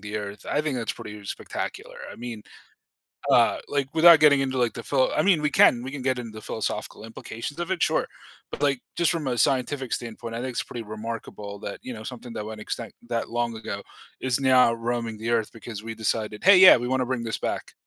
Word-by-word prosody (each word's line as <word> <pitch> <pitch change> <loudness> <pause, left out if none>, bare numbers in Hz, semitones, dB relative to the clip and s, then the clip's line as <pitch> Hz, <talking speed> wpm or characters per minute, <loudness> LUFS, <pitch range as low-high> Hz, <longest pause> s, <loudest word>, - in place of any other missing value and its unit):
the 105 +1 -5
earth, 105 0 -6
I 145 - +1
think 150 -4 -2
that's 115 -3 -2
pretty 105 -1 -9
spectacular. - - -5 0.2
I - - -12
mean, 115 -3 -7 0.9
uh, - - +5
like, 140 -2 -1
without 165 -1 +8
getting 145 -2 +6
into, 130 -1 -1
like, 120 -2 +1
the 115 - -7
philo 135 -2 +2
I 155 - +2
mean, 180 -4 +4
we 150 - +2
can 120 -3 +5
we 130 - -5
can 145 -2 -6
get 130 -1 0
into 115 -2 -6
the 110 - -9
philosophical 110 0 -4
implications 115 +6 -7
of 175 +2 -3
it, 185 - -1
sure, - - +2 0.4
but, - - -6
like, 140 -3 +2
just 170 -3 +3
from 165 -5 -2
a 125 -2 -1
scientific 130 +1 +1
standpoint, 115 0 -5
I 115 - -3
think 130 0 -3
it's - - -2
pretty 120 -2 -7
remarkable 105 -1 -7
that, 100 - -6
you 130 - -6
know, 110 - -8
something 120 0 -8
that 105 - -5
went 110 0 -7
extinct 115 -1 -5
that 115 -1 -2
long 120 0 -1
ago 100 -2 -5 0.4
is 130 0 0
now 130 -3 +5
roaming 115 -1 -3
the 115 +2 -4
earth 115 -2 +1
because 110 -2 -8
we 115 0 -6
decided, 110 -1 -2
"Hey, 195 0 +8
yeah, 185 -6 +10
we 120 0 -3
wanna 130 0 +1
bring 125 -1 -2
this 115 -1 -3
back." - - -4
120 Hz, 230 wpm, -25 LUFS, 110-135 Hz, 0.9 s, yeah